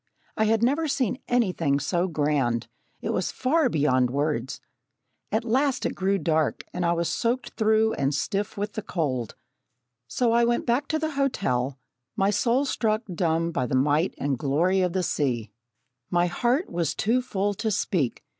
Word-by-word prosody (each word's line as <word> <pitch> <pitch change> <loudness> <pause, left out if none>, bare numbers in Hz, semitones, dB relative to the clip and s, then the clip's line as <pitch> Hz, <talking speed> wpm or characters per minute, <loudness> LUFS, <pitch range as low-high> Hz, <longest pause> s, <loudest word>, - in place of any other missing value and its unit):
I 220 - +2
had 225 +1 +2
never 290 +6 +2
seen 260 -3 0
anything 180 - +1
so 175 +6 0
grand 145 -8 0 0.3
it - - -2
was - - -1
far 275 +2 +2
beyond 130 - +2
words. 135 -2 -2 0.7
At 220 +2 0
last 265 +3 +1
it - - 0
grew 195 +1 +1
dark 160 -4 0
and 180 - -2
I 170 0 +2
was 170 0 0
soaked 245 +1 -1
through 220 0 +2
and 135 0 0
stiff 195 +9 -2
with 205 +1 -3
the 215 - -3
cold. 135 - -2 0.7
So 240 - +1
I 235 +1 +4
went 235 0 +1
back 255 +4 +1
to 315 - 0
the 315 0 -2
hotel, 140 - 0 0.4
my 195 +1 +2
soul 240 +6 +2
struck 220 -4 0
dumb 165 -1 0
by 130 -6 -1
the 130 - -1
might 150 +6 +2
and 140 -3 -1
glory 170 +8 +2
of 180 -2 0
the 185 - 0
sea. 120 - -1 0.6
My 175 0 +2
heart 245 - 0
was 170 -3 -1
too 235 +5 +1
full 205 -4 -1
to 220 +2 -2
speak. 175 - -1
190 Hz, 175 wpm, -26 LUFS, 145-235 Hz, 0.7 s, I